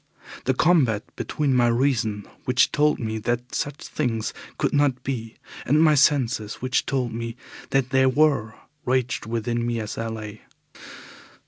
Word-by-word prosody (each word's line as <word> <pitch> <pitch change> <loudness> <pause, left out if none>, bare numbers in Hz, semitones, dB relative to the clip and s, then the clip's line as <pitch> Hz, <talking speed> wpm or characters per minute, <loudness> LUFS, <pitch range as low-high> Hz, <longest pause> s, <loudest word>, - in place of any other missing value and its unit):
The 130 - +2
combat 130 -10 +3
between 145 -3 -1
my 120 -1 +4
reason, 115 -4 +1 0.2
which 125 -1 +3
told 150 -1 +2
me 110 -1 -3
that 120 +3 -2
such 145 0 -3
things 115 -7 -2 0.2
could - - 0
not 140 -3 +2
be, 115 -4 -4 0.3
and 150 +4 +3
my 155 -1 +6
senses, 130 -7 +2
which 130 0 -1
told 130 -4 -1
me 115 0 -4 0.3
that 135 -1 +1
they 130 -1 +4
were, 130 -5 +2 0.3
raged 130 -3 0
within 115 +1 -1
me 120 -1 -1
as 110 0 -5
I 115 - -2
lay. 110 -1 -7
125 Hz, 150 wpm, -24 LUFS, 115-135 Hz, 0.3 s, my